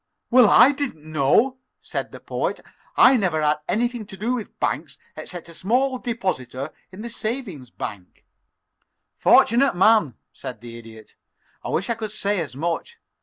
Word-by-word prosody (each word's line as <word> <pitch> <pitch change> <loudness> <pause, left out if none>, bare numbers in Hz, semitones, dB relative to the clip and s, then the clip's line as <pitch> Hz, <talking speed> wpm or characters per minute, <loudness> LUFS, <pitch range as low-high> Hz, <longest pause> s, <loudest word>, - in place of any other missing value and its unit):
"Well, 245 -3 +7
I 260 - +7
didn't 275 - -4
know," 155 - +2 0.2
said - - -5
the - - -10
Poet. - - -3 0.4
"I 260 0 +7
never 180 -7 0
had 150 0 +2
anything 240 -1 -1
to 195 - -10
do 225 +6 -1
with 235 -4 -6
banks - - -2 0.2
except 175 -2 -8
as 170 - -12
a - - -7
small 255 +6 +1
depositor 160 - -3 0.2
in 195 +3 -9
the 235 - -5
savings 215 - -5
bank." 100 -6 -8 0.9
"Fortunate 245 0 +4
man," 190 - +4 0.2
said 120 -4 -8
the 120 -1 -9
Idiot. 110 -2 -14 0.5
"I - - -5
wish 195 - -1
I 235 - +1
could 220 -2 -5
say 205 -1 -1
as 145 -5 -6
much. 170 - -3
200 Hz, 165 wpm, -23 LUFS, 150-240 Hz, 0.9 s, Well